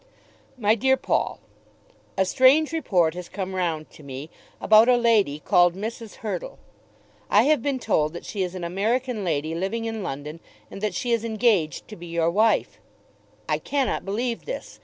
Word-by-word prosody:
MY 215 Hz, -3 st, +3 dB
DEAR 265 Hz, +4 st, +2 dB
PAUL, -, -, -1 dB, 0.8 s
A 190 Hz, -, +3 dB
strange 275 Hz, -, +4 dB
report 180 Hz, -, +1 dB
has 180 Hz, 0 st, -8 dB
come 190 Hz, -1 st, -5 dB
round 165 Hz, -4 st, -2 dB
to -, -, -15 dB
me 140 Hz, +2 st, -8 dB, 0.3 s
about 220 Hz, +3 st, +6 dB
a 250 Hz, -, +5 dB
lady 220 Hz, -11 st, +3 dB
called 175 Hz, 0 st, +4 dB
Mrs. 220 Hz, +2 st, -6 dB
Hurtle. -, -, -4 dB, 0.7 s
I -, -, +5 dB
have 300 Hz, -3 st, +3 dB
been 275 Hz, +1 st, -1 dB
told 155 Hz, -10 st, 0 dB
that 175 Hz, -, -8 dB
she 200 Hz, -, -4 dB
is 185 Hz, 0 st, -2 dB
an 180 Hz, -, -5 dB
American 220 Hz, +6 st, -1 dB
lady 155 Hz, -2 st, -1 dB
living 195 Hz, +7 st, -2 dB
in 225 Hz, -1 st, -4 dB
London, 150 Hz, -1 st, -6 dB, 0.3 s
and 195 Hz, -, -8 dB
that 210 Hz, -4 st, -2 dB
she 240 Hz, +5 st, -2 dB
is 230 Hz, -1 st, +1 dB
engaged 215 Hz, -, +1 dB
to 215 Hz, -, -9 dB
be 175 Hz, -2 st, -10 dB
your 170 Hz, 0 st, 0 dB
wife. 220 Hz, +4 st, +1 dB, 0.7 s
I -, -, 0 dB
cannot 275 Hz, -2 st, -1 dB
believe 230 Hz, +4 st, -3 dB
this. -, -, -7 dB
205 Hz, 175 wpm, -24 LUFS, 170-235 Hz, 0.8 s, about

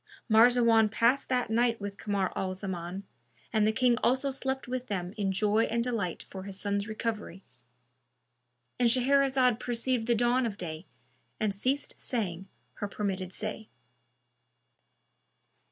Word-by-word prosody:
Marzawan 230 Hz, -1 st, +5 dB
passed 235 Hz, +5 st, +2 dB
that 250 Hz, -3 st, 0 dB
night 230 Hz, 0 st, +2 dB
with 200 Hz, -1 st, -6 dB
Kamar 200 Hz, -3 st, -1 dB
al 185 Hz, -1 st, -2 dB
Zaman, 185 Hz, -1 st, -5 dB, 0.5 s
and 215 Hz, -1 st, +3 dB
the -, -, +4 dB
King 245 Hz, +1 st, +3 dB
also 265 Hz, +2 st, +2 dB
slept 265 Hz, -1 st, -3 dB
with 255 Hz, 0 st, -4 dB
them 185 Hz, -2 st, -3 dB
in 200 Hz, -3 st, 0 dB
joy 210 Hz, +3 st, +2 dB
and 235 Hz, +1 st, 0 dB
delight 220 Hz, -8 st, -2 dB
for 190 Hz, -, -8 dB
his 195 Hz, 0 st, -7 dB
son's 200 Hz, 0 st, -1 dB
recovery.—And 125 Hz, -, -6 dB
Shahrazad 260 Hz, -1 st, +3 dB
perceived 240 Hz, -1 st, -1 dB
the 235 Hz, -, +3 dB
dawn 240 Hz, +2 st, +2 dB
of 205 Hz, -3 st, -6 dB
day 160 Hz, -1 st, -6 dB, 0.5 s
and 215 Hz, -2 st, 0 dB
ceased 260 Hz, +8 st, -2 dB
saying 190 Hz, -6 st, -2 dB, 0.3 s
her 205 Hz, -, -3 dB
permitted 195 Hz, -3 st, -3 dB
say. 215 Hz, +2 st, -5 dB
215 Hz, 135 wpm, -29 LUFS, 190-245 Hz, 0.5 s, Marzawan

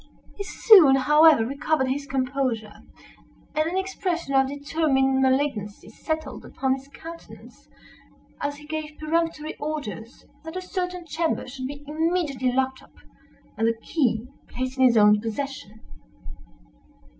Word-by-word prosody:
He 400 Hz, -, -5 dB
soon, 385 Hz, -, +6 dB
however, 300 Hz, -1 st, +5 dB
recovered 280 Hz, +2 st, 0 dB
his 280 Hz, +2 st, -2 dB
composure, 255 Hz, -5 st, -2 dB, 0.8 s
and 310 Hz, +1 st, +1 dB
an 365 Hz, -, -2 dB
expression 370 Hz, -5 st, -2 dB
of 270 Hz, 0 st, +4 dB
determined 280 Hz, -2 st, +1 dB
malignancy 260 Hz, -7 st, 0 dB
settled 315 Hz, +7 st, -5 dB
upon 265 Hz, -1 st, -1 dB
his 270 Hz, +1 st, -7 dB
countenance, 330 Hz, +4 st, -12 dB, 0.7 s
as 285 Hz, 0 st, -2 dB
he 295 Hz, +1 st, -13 dB
gave 310 Hz, 0 st, -5 dB
peremptory 315 Hz, 0 st, -1 dB
orders 285 Hz, -6 st, -6 dB, 0.2 s
that 320 Hz, +1 st, -8 dB
a -, -, -1 dB
certain 360 Hz, -2 st, -4 dB
chamber 330 Hz, -3 st, -2 dB
should 255 Hz, 0 st, -6 dB
be 285 Hz, +1 st, -9 dB
immediately 305 Hz, -5 st, 0 dB
locked 265 Hz, +1 st, -1 dB
up, -, -, -21 dB, 0.6 s
and 225 Hz, +1 st, +1 dB
the 230 Hz, 0 st, 0 dB
key 240 Hz, -4 st, 0 dB, 0.2 s
placed 255 Hz, +1 st, -5 dB
in 260 Hz, -, +6 dB
his 240 Hz, -2 st, +5 dB
own 210 Hz, 0 st, +6 dB
possession. 225 Hz, -2 st, -5 dB
280 Hz, 135 wpm, -24 LUFS, 260-315 Hz, 0.8 s, soon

